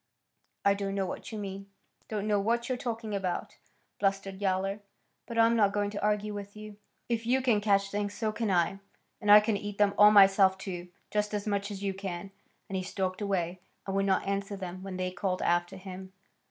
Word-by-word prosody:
"I 200 - +6
don't 200 0 -3
know 195 -1 0
what 180 - -6
you 220 - -5
mean; 195 -1 -6 0.4
don't 210 -1 -2
know 205 -1 +3
what 235 +4 0
you're 255 - 0
talking 225 -3 -4
about," 190 -3 -3 0.4
blustered 195 0 -1
Yowler. 195 +1 0 0.5
"But 235 - -5
I'm 230 0 +5
not 205 -3 +3
going 205 0 0
to 205 - -5
argue 210 0 0
with 200 0 -7
you. 215 -1 -9 0.3
If 230 -1 -2
you 255 +2 +3
can 240 -5 +2
catch 200 -1 +2
things, 205 0 -2
so 220 -2 -1
can 220 0 -2
I. 180 +1 +2 0.4
And 210 - -2
I 210 - +11
can 210 -1 0
eat 205 0 -6
them 205 -1 +3
all 210 0 +10
myself, 195 -2 +6
too, 180 -2 -6 0.2
just 210 0 0
as 205 - -3
much 200 -1 -1
as 200 -1 -6
you 195 -1 0
can." 190 -1 -6 0.4
And 195 - -5
he 190 - 0
stalked 185 +1 -3
away, 185 -3 -1 0.3
and 195 - -3
would 195 0 +1
not 190 -1 +2
answer 200 +1 -2
them 185 -1 -6
when 190 -1 -6
they 185 0 -2
called 185 0 -2
after 175 +2 +1
him. 190 0 -9
200 Hz, 210 wpm, -30 LUFS, 190-210 Hz, 0.5 s, I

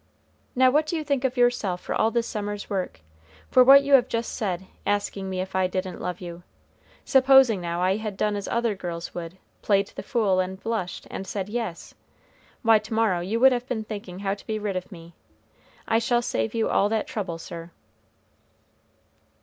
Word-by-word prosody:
"Now 255 0 +5
what 300 +3 +2
do 335 - -2
you 310 - -3
think 280 -3 -1
of 260 -1 -1
yourself 245 -7 +2
for - - -4
all 220 - +2
this 235 0 0
summer's 205 -2 -4
work? 185 - -3 0.5
for 255 - +7
what 275 +2 +8
you 280 0 0
have 260 -3 +6
just 230 0 -3
said, 190 -3 -3 0.2
asking 200 -1 -1
me 185 -1 -2
if 190 0 -6
I 185 -1 +2
didn't 185 0 -4
love 180 -1 -4
you? 175 -1 -8 0.6
Supposing, 265 -6 +5
now, 170 +1 -2
I 190 +2 +2
had 215 -3 -5
done 210 0 0
as 200 -1 -4
other 235 -2 0
girls 175 -3 -6
would, 170 +1 -7 0.2
played 200 -1 +2
the - - -8
fool 195 -3 +1
and 185 +1 -2
blushed, 215 -5 -3
and 190 - -6
said 195 0 -4
yes? 225 -6 -4 0.7
Why, 225 -2 +6
to 220 +1 -6
morrow 220 -6 +2
you 195 +6 -2
would 265 0 +8
have 250 0 -2
been 225 -4 -2
thinking 205 -4 -7
how 195 0 -1
to 200 - -11
be 220 - -1
rid 205 -2 -3
of 185 +2 -5
me! 170 -2 -12 0.7
I 225 - +3
shall 240 +1 +1
save 110 - -2
you 225 - +1
all 200 - +2
that 220 -1 0
trouble, 185 -6 -4
sir." 165 0 -8
205 Hz, 200 wpm, -25 LUFS, 185-235 Hz, 0.7 s, what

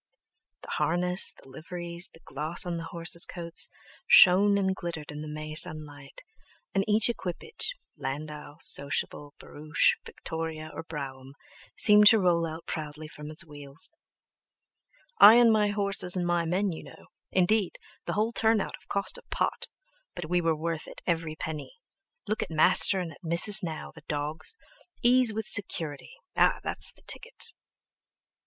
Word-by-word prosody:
The - - -9
harness, 175 +4 +2
the - - -19
liveries, 170 +5 -4
the 165 - -20
gloss 155 +6 +1
on 175 -1 -3
the 165 - -6
horses' 170 0 -2
coats, 170 -2 0 0.4
shone 200 +2 +7
and 190 -1 0
glittered 165 -5 -7
in 150 0 -8
the 155 - -7
May 155 0 -7
sunlight, 150 -3 0 0.5
and 195 - +1
each 215 0 +4
equipage, 235 - -4 0.2
landau, 150 +1 -7
sociable, 145 0 +1
barouche, 150 +1 0
Victoria, 160 -1 -7
or - - -6
brougham, 135 -4 -8 0.4
seemed 210 0 +6
to 225 - +7
roll 175 -4 +1
out 160 +1 -9
proudly 155 -1 -6
from 150 0 -11
its 155 +2 -4
wheels: 145 -1 -8 1.3
"I 215 - +10
and 240 -1 +5
my 210 -1 +2
horses 200 -3 0
and 180 -1 -2
my 175 -1 0
men 185 +4 -1
you 160 - -8
know, - - -15 0.3
Indeed 190 +2 +1 0.3
the - - -3
whole 215 +2 0
turn 225 -1 +2
out - - -4
have - - -24
cost 200 - -1
a - - -20
pot. - - -2 0.5
But 175 -2 -7
we 180 0 +2
were 165 -1 0
worth 160 0 -5
it - - -12
every 165 -3 -2
penny. 155 - -7 0.5
Look 215 +1 -2
At - - -4
Master 160 +4 +5
and 175 -3 -5
at 160 - -17
Missis 175 +6 +6
now, 165 -4 -6
the - - -14
dawgs! 150 - -4 0.5
Ease 245 -1 +4
with 220 0 -4
security—ah! 190 - 0
that's - - +2
the - - -23
ticket!" 485 0 -5
170 Hz, 155 wpm, -27 LUFS, 155-200 Hz, 1.3 s, I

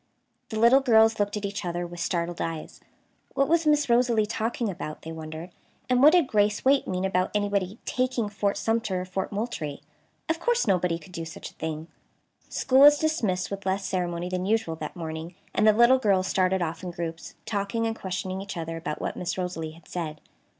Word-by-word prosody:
The 220 - -4
little 235 +4 +6
girls 225 -4 +4
looked 205 +1 0
at 205 - -4
each 200 0 -4
other 175 0 -2
with 175 0 -9
startled 170 0 -2
eyes. 165 -1 -5 0.5
What 275 - +3
was 330 -1 +2
Miss 295 -1 +4
Rosalie 235 -2 +3
talking 225 +2 -2
about, 160 -5 -6
they 160 - -6
wondered, 160 +2 -7 0.4
and 250 0 +3
what 300 +4 +8
did 350 -4 +5
Grace 210 -2 +1
Waite 275 +1 +4
mean 185 0 -1
about 185 -1 +1
anybody 200 -1 0
"taking" 255 -3 0
Fort 205 0 -1
Sumter 225 -5 0
or - - -5
Fort 190 +2 -3
Moultrie? 200 -10 -4 0.4
Of 325 0 0
course 480 +4 +1
nobody 180 -4 +2
could 170 +3 -15
do 170 -2 -5
such 165 - -8
a - - -27
thing. 160 0 -5 0.6
School 260 0 +2
was 290 +1 +9
dismissed 220 -14 0
with 200 0 -5
less 190 +1 -1
ceremony 175 -1 -2
than 185 +1 -2
usual 215 -7 +1
that 155 -1 -6
morning, 165 0 -6 0.2
and 215 - +3
the - - +9
little 235 +4 +5
girls 195 -5 +2
started 185 -1 +1
off 165 0 -4
in 180 - -5
groups, 165 -1 -6
talking 210 +2 -1
and 225 0 -1
questioning 190 -1 -4
each 195 -2 -6
other 165 0 -4
about 150 -2 -4
what - - -3
Miss 180 - -3
Rosalie 165 -4 -3
had 165 0 -18
said. 155 -4 -4
190 Hz, 200 wpm, -26 LUFS, 170-225 Hz, 0.6 s, was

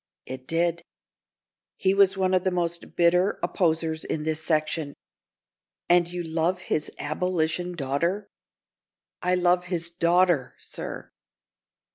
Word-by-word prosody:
"It 130 0 -8
did." 170 +1 +1 1.0
"He 190 - +2
was 195 0 +4
one 190 -1 +1
of 185 -1 +3
the 190 - +2
most 170 -2 -3
bitter 180 +3 +3
opposers 160 -3 0
in 150 - -3
this 160 0 -2
section. 155 -2 0 0.9
And 175 -1 +5
you 175 0 -4
love 165 +2 0
his 155 -3 -2
abolition 175 +2 -1
daughter?" 170 +8 -1 0.9
"I 180 +1 +2
love 180 0 +2
his 170 -1 -1
daughter, 170 -4 +2
sir!" - - -7
170 Hz, 120 wpm, -26 LUFS, 160-180 Hz, 1.0 s, And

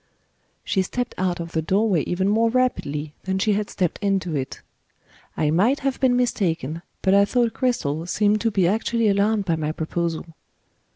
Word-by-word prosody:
She 190 - +1
stepped 245 +6 -3
out 180 -2 0
of 170 0 -6
the 160 - 0
doorway 190 +1 +2
even 190 +2 0
more 225 +3 +3
rapidly 155 - -1
than 190 0 -1
she 210 +2 +2
had 205 0 -1
stepped 180 -4 -1
into 195 -5 0
it. 135 -2 -4 0.8
I 150 - +1
might 225 - +2
have 275 -1 -1
been 255 -2 +3
mistaken, 170 - -1 0.2
but 190 - +3
I 200 0 +6
thought 235 +2 +1
Cristel 165 - -1
seemed 210 +3 +2
to 230 - +2
be 195 -5 +2
actually 225 +3 +1
alarmed 205 +1 +2
by 165 -3 0
my 155 -1 -1
proposal. 165 +1 -3
195 Hz, 175 wpm, -23 LUFS, 165-225 Hz, 0.8 s, I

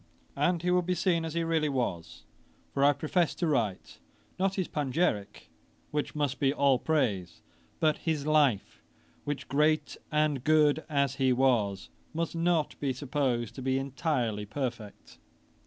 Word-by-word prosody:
And 175 -2 +1
he 180 - +1
will 180 0 +4
be 180 +1 -1
seen 170 -1 +1
as 160 0 -5
he 170 - +1
really 160 -2 +1
was; 100 -11 -3 0.5
for 140 - +1
I 145 - +7
profess 160 +3 0
to 175 - -1
write, 115 - -1 0.4
not 195 +1 +1
his 185 -3 -1
panegyrick, 135 - -2 0.4
which 150 0 -2
must 145 -3 -1
be 135 -2 +3
all 140 -3 +3
praise, 105 - -1 0.4
but 155 -1 +2
his 155 -4 -2
Life; 145 -9 +2 0.4
which, 145 -1 -4
great 150 +2 +1
and 150 -4 +1
good 155 0 +3
as 140 -3 0
he 130 -1 +3
was, 120 -6 +1 0.3
must 165 0 -2
not 165 -2 0
be 135 -2 -1
supposed 130 -4 -1
to 135 - -8
be 130 0 0
entirely 130 -6 -2
perfect. 120 -3 -6
145 Hz, 155 wpm, -29 LUFS, 125-160 Hz, 0.5 s, I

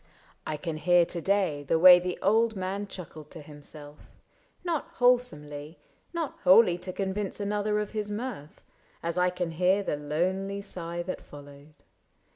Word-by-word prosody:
I 155 - -2
can 165 -1 -4
hear 175 +1 +4
to 170 0 -4
day 190 -6 +1
The 145 +3 +1
way 180 +1 +9
the 180 0 -4
old 220 +2 +3
man 195 +2 -3
chuckled 160 -5 -10
to 165 - -10
himself 145 0 -12 0.3
— - - -38
Not 335 -5 -1
wholesomely, 160 -12 0 0.3
not 330 -3 -4
wholly 185 -1 +6
to 185 - -6
convince 195 +2 -3
Another 210 +1 -1
of 210 -1 -4
his 210 -1 -3
mirth, 210 - -6 0.2
— - - -34
as 170 +1 -1
I 180 0 +3
can 180 -2 -3
hear 185 +4 +2
The 150 - -2
lonely 185 +7 -2
sigh 175 -3 -5
that 185 - -5
followed. 145 +1 -14
180 Hz, 165 wpm, -28 LUFS, 155-205 Hz, 0.3 s, way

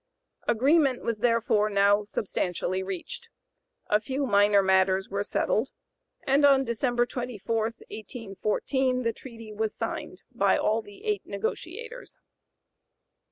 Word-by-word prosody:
Agreement 270 +2 +3
was 230 -2 -2
therefore 230 -2 +2
now 200 +1 +3
substantially 185 -3 -2
(p. - - -2
093) - - -4
reached; 470 - -6 0.6
a 210 - +2
few 265 +5 -2
minor 205 -3 +4
matters 190 0 +3
were 200 +1 -1
settled, 220 +3 0 0.6
and 275 +2 +3
on 275 -1 +6
December 240 0 0
24, 230 -3 -2
1814, 230 +3 -2
the 230 -1 0
treaty 230 -3 -10
was 220 0 -2
signed - - -5
by - - +2
all 220 +1 +1
the 205 -2 -15
eight 420 -1 0
negotiators. 420 - -5
225 Hz, 125 wpm, -27 LUFS, 205-260 Hz, 0.6 s, on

